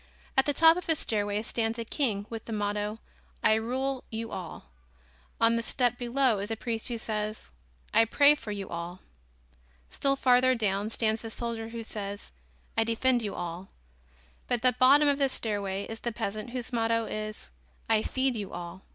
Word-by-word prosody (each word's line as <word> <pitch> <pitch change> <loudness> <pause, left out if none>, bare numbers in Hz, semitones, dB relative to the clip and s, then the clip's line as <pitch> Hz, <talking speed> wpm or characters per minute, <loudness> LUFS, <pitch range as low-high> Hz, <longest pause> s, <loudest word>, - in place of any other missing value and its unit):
At 265 - +4
the - - +4
top 325 +3 +7
of 360 - -6
a 320 - +5
stairway 205 -5 -1
stands 225 0 -1
a 230 - -4
king 220 -6 -1
with 225 -1 -7
the - - -7
motto: 210 0 -1 0.5
"I - - +6
rule 255 +4 -1
you 225 0 -5
all," 175 - -7 0.7
on 230 0 +4
a - - -1
step 245 +1 0
below 245 -2 +2
is 200 +2 -4
a 225 - -1
priest 225 0 -2
who 240 - -2
says: 215 -1 -4 0.4
"I 225 - +6
pray 285 +6 +6
for 260 -8 -6
you 200 -2 -4
all;" 170 +2 -6 0.9
still 275 0 +1
farther 255 -1 +4
down 205 -2 0
stands 220 -1 0
the 225 - -6
soldier 225 -1 -4
who 230 0 -6
says: 205 -2 -6 0.4
"I 225 - +3
defend 240 +2 +2
you 205 -3 -4
all;" 175 +2 -5 0.8
but - - +2
at 235 - -5
the 255 -1 +5
bottom 280 +4 +7
of 285 0 +2
the 275 -1 +3
stairway 200 -5 -2
is 225 0 -7
the 235 - -3
peasant 215 +1 -4
whose 245 0 -5
motto 230 -1 +1
is: 215 0 -6 0.4
"I 220 -1 +3
feed 260 +2 0
you 205 -3 -5
all." 175 +1 -7
225 Hz, 185 wpm, -29 LUFS, 210-245 Hz, 0.9 s, top